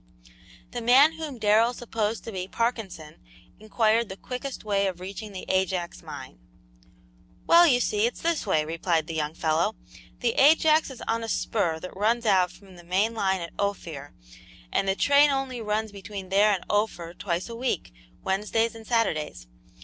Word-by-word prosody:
The 240 Hz, -, -4 dB
man 260 Hz, +6 st, +6 dB
whom 315 Hz, -5 st, -6 dB
Darrell 220 Hz, +3 st, +3 dB
supposed 225 Hz, -2 st, -3 dB
to 225 Hz, -, -7 dB
be 185 Hz, -2 st, -4 dB
Parkinson 200 Hz, -9 st, -3 dB, 0.4 s
inquired 220 Hz, +1 st, +1 dB
the 190 Hz, -, -7 dB
quickest 255 Hz, +4 st, -6 dB
way 200 Hz, -2 st, +1 dB
of 180 Hz, -2 st, -4 dB
reaching 200 Hz, +3 st, -7 dB
the 190 Hz, -, -7 dB
Ajax 185 Hz, -2 st, -1 dB
mine. -, -, -10 dB, 1.1 s
"Well, 340 Hz, +1 st, +7 dB
you 250 Hz, -5 st, +4 dB
see 215 Hz, -2 st, +1 dB
it's 240 Hz, -, -6 dB
this 330 Hz, -8 st, 0 dB
way," 155 Hz, -5 st, +2 dB
replied 165 Hz, 0 st, 0 dB
the 165 Hz, -, -6 dB
young 155 Hz, 0 st, -2 dB
fellow. 165 Hz, +7 st, 0 dB, 0.5 s
"The 240 Hz, -2 st, +2 dB
Ajax 310 Hz, +2 st, +5 dB
is 265 Hz, -, -9 dB
on 230 Hz, 0 st, 0 dB
a 225 Hz, -, -5 dB
spur 175 Hz, -8 st, 0 dB
that 185 Hz, -, -8 dB
runs 230 Hz, +4 st, +1 dB
out 185 Hz, -4 st, +3 dB
from 185 Hz, +1 st, -16 dB
the 175 Hz, -, -13 dB
main 190 Hz, +6 st, +1 dB
line 190 Hz, -4 st, 0 dB
at 170 Hz, -, -7 dB
Ophir, 165 Hz, -8 st, -4 dB, 0.6 s
and 195 Hz, -, 0 dB
the 195 Hz, -, +2 dB
train 285 Hz, +6 st, +5 dB
only 270 Hz, -3 st, -2 dB
runs 215 Hz, 0 st, -2 dB
between 195 Hz, -1 st, -8 dB
there 205 Hz, +2 st, +4 dB
and 195 Hz, -3 st, -2 dB
Ophir 205 Hz, -5 st, -1 dB
twice 175 Hz, -1 st, -3 dB
a 230 Hz, -, -7 dB
week, 245 Hz, -, -2 dB, 0.3 s
Wednesdays 215 Hz, +4 st, 0 dB
and 225 Hz, -1 st, -12 dB
Saturdays. 160 Hz, -, -1 dB
210 Hz, 170 wpm, -26 LUFS, 185-235 Hz, 1.1 s, Well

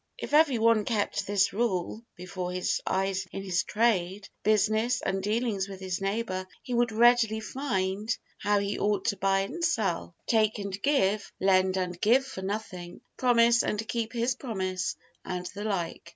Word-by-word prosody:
If -, -, -7 dB
every 300 Hz, -4 st, +5 dB
one 225 Hz, -1 st, +4 dB
kept 205 Hz, -3 st, -1 dB
this 200 Hz, -1 st, +2 dB
rule 210 Hz, -2 st, -1 dB
before 180 Hz, 0 st, -5 dB
his 180 Hz, 0 st, -1 dB
eyes 190 Hz, 0 st, 0 dB
in 195 Hz, -, -5 dB
his 180 Hz, -2 st, +1 dB
trade, 205 Hz, -3 st, 0 dB
business, 215 Hz, +3 st, +2 dB
and 195 Hz, 0 st, -2 dB
dealings 210 Hz, -1 st, -1 dB
with 195 Hz, -1 st, -8 dB
his 185 Hz, -1 st, -4 dB
neighbor, 195 Hz, -2 st, -2 dB, 0.2 s
he 250 Hz, -, -5 dB
would 240 Hz, -1 st, +2 dB
readily 230 Hz, -1 st, +4 dB
find 210 Hz, -4 st, -2 dB, 0.2 s
how 205 Hz, 0 st, +2 dB
he 200 Hz, 0 st, -1 dB
ought 205 Hz, 0 st, 0 dB
to 200 Hz, -, -2 dB
buy 195 Hz, 0 st, +2 dB
and 290 Hz, +13 st, -5 dB
sell, 200 Hz, -, 0 dB
take 220 Hz, -1 st, +2 dB
and 200 Hz, -1 st, -5 dB
give, 215 Hz, -8 st, +1 dB
lend 190 Hz, 0 st, +3 dB
and 180 Hz, -1 st, -3 dB
give 255 Hz, +5 st, +4 dB
for 265 Hz, -8 st, -7 dB
nothing, 190 Hz, -3 st, -5 dB
promise 235 Hz, -2 st, +4 dB
and 210 Hz, +1 st, -2 dB
keep 230 Hz, -2 st, -2 dB
his 240 Hz, +2 st, 0 dB
promise, 190 Hz, -7 st, -3 dB, 0.3 s
and 180 Hz, -1 st, -4 dB
the 205 Hz, +2 st, -6 dB
like. 180 Hz, -6 st, -3 dB
205 Hz, 165 wpm, -28 LUFS, 190-230 Hz, 0.3 s, every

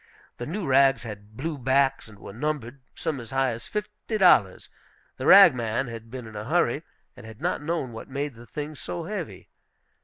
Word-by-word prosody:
The 120 Hz, -, -5 dB
new 185 Hz, +4 st, -3 dB
rags 135 Hz, -1 st, +4 dB
had 105 Hz, -1 st, -10 dB
blue 150 Hz, +1 st, -3 dB
backs, 135 Hz, +1 st, +2 dB
and 110 Hz, -2 st, -14 dB
were 100 Hz, -, -10 dB
numbered, 140 Hz, 0 st, -3 dB
some 155 Hz, -4 st, -3 dB
as 115 Hz, -2 st, -9 dB
high 135 Hz, 0 st, +1 dB
as 115 Hz, 0 st, -7 dB
fifty 210 Hz, +1 st, -4 dB
dollars. 120 Hz, -, +4 dB, 0.5 s
The -, -, -3 dB
rag -, -, +10 dB
man 120 Hz, +1 st, -2 dB
had 115 Hz, 0 st, -9 dB
been 125 Hz, 0 st, -7 dB
in 110 Hz, -1 st, -11 dB
a 105 Hz, +1 st, -5 dB
hurry, -, -, +2 dB, 0.3 s
and -, -, -13 dB
had 110 Hz, 0 st, -11 dB
not -, -, -1 dB
known 150 Hz, -5 st, -2 dB
what 115 Hz, +3 st, -9 dB
made 140 Hz, +1 st, -3 dB
the 120 Hz, +1 st, -14 dB
things 150 Hz, 0 st, -6 dB
so 90 Hz, -1 st, -5 dB
heavy. -, -, -6 dB
130 Hz, 195 wpm, -26 LUFS, 115-150 Hz, 0.5 s, rag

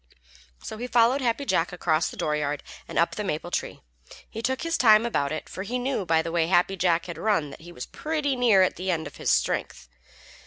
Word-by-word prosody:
So 220 Hz, -, -7 dB
he 245 Hz, -, -4 dB
followed 245 Hz, +3 st, +3 dB
Happy 250 Hz, +3 st, 0 dB
Jack 165 Hz, -9 st, +1 dB
across 165 Hz, -3 st, 0 dB
the -, -, -11 dB
dooryard 150 Hz, -1 st, -1 dB, 0.2 s
and -, -, -6 dB
up -, -, +3 dB
the -, -, -3 dB
maple -, -, -3 dB
tree. -, -, -3 dB, 0.5 s
He 225 Hz, -, -7 dB
took 260 Hz, +2 st, -1 dB
his 335 Hz, 0 st, 0 dB
time 220 Hz, -4 st, +5 dB
about 140 Hz, -12 st, 0 dB
it, 155 Hz, -, -4 dB
for -, -, -7 dB
he 230 Hz, +6 st, -3 dB
knew 250 Hz, -6 st, -2 dB
by 160 Hz, -1 st, +3 dB
the 165 Hz, -, -4 dB
way 165 Hz, -1 st, +1 dB
Happy 180 Hz, +2 st, +2 dB
Jack 175 Hz, -2 st, +1 dB
had 170 Hz, -2 st, -7 dB
run 165 Hz, -8 st, 0 dB
that -, -, -12 dB
he 175 Hz, +1 st, -11 dB
was 125 Hz, -, -7 dB
pretty 300 Hz, -3 st, -2 dB
nearly 225 Hz, -7 st, +5 dB
at -, -, -3 dB
the 185 Hz, +1 st, -4 dB
end 165 Hz, -3 st, 0 dB
of 145 Hz, -, -10 dB
his -, -, -2 dB
strength. 60 Hz, 0 st, 0 dB
190 Hz, 230 wpm, -26 LUFS, 165-240 Hz, 0.5 s, time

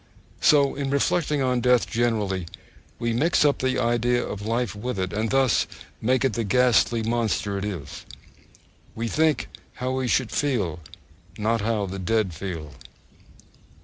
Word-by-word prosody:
So 140 Hz, -2 st, +4 dB
in 140 Hz, -1 st, -3 dB
reflecting 145 Hz, +1 st, +1 dB
on 125 Hz, -1 st, +1 dB
death 125 Hz, 0 st, +3 dB
generally, 105 Hz, -7 st, -1 dB, 0.5 s
we 115 Hz, -1 st, -1 dB
mix 150 Hz, +6 st, +3 dB
up 145 Hz, -, +3 dB
the 130 Hz, 0 st, 0 dB
idea 120 Hz, 0 st, +1 dB
of 100 Hz, -1 st, -6 dB
life 115 Hz, -2 st, 0 dB
with 110 Hz, +2 st, -4 dB
it, 95 Hz, -2 st, -2 dB
and 110 Hz, +2 st, -1 dB
thus 135 Hz, -3 st, +2 dB, 0.3 s
make 130 Hz, +4 st, +2 dB
it 130 Hz, -, +1 dB
the 115 Hz, -, -1 dB
ghastly 115 Hz, +1 st, +3 dB
monster 110 Hz, -3 st, -1 dB
it 95 Hz, -, -3 dB
is. 85 Hz, -9 st, -6 dB, 0.9 s
We 115 Hz, +1 st, -2 dB
think, 155 Hz, +4 st, +1 dB, 0.3 s
how 125 Hz, +1 st, -3 dB
we 130 Hz, -1 st, -1 dB
should 125 Hz, -1 st, +1 dB
feel, 105 Hz, -, -1 dB, 0.6 s
not 110 Hz, +1 st, 0 dB
how 105 Hz, -1 st, 0 dB
the 95 Hz, +1 st, -6 dB
dead 100 Hz, 0 st, 0 dB
feel. 80 Hz, -4 st, -6 dB
115 Hz, 150 wpm, -24 LUFS, 105-130 Hz, 0.9 s, So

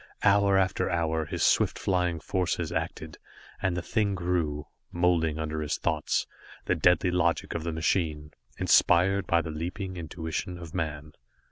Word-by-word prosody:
Hour 100 Hz, -1 st, +4 dB
after 95 Hz, -1 st, +1 dB
hour 80 Hz, -2 st, 0 dB
his -, -, -3 dB
swift -, -, +3 dB
flying 90 Hz, -3 st, 0 dB
forces 90 Hz, +3 st, -1 dB
acted, -, -, -4 dB, 0.4 s
and 95 Hz, -3 st, 0 dB
the 90 Hz, -, -3 dB
thing 105 Hz, -2 st, 0 dB
grew, 85 Hz, -5 st, -1 dB, 0.3 s
moulding 85 Hz, -3 st, +1 dB
under 80 Hz, 0 st, -3 dB
his 75 Hz, -, -1 dB
thoughts, 80 Hz, -3 st, 0 dB, 0.4 s
the -, -, +2 dB
deadly 90 Hz, +1 st, +3 dB
logic 85 Hz, -2 st, 0 dB
of 85 Hz, -, -3 dB
the 85 Hz, -, -2 dB
machine, 80 Hz, -2 st, -1 dB, 0.3 s
inspired 95 Hz, +2 st, +4 dB
by 85 Hz, 0 st, +3 dB
the 80 Hz, -, -5 dB
leaping 90 Hz, +4 st, -5 dB
intuition 85 Hz, +1 st, -4 dB
of 85 Hz, -2 st, -10 dB
man. 75 Hz, -3 st, -4 dB
85 Hz, 150 wpm, -28 LUFS, 80-90 Hz, 0.4 s, Hour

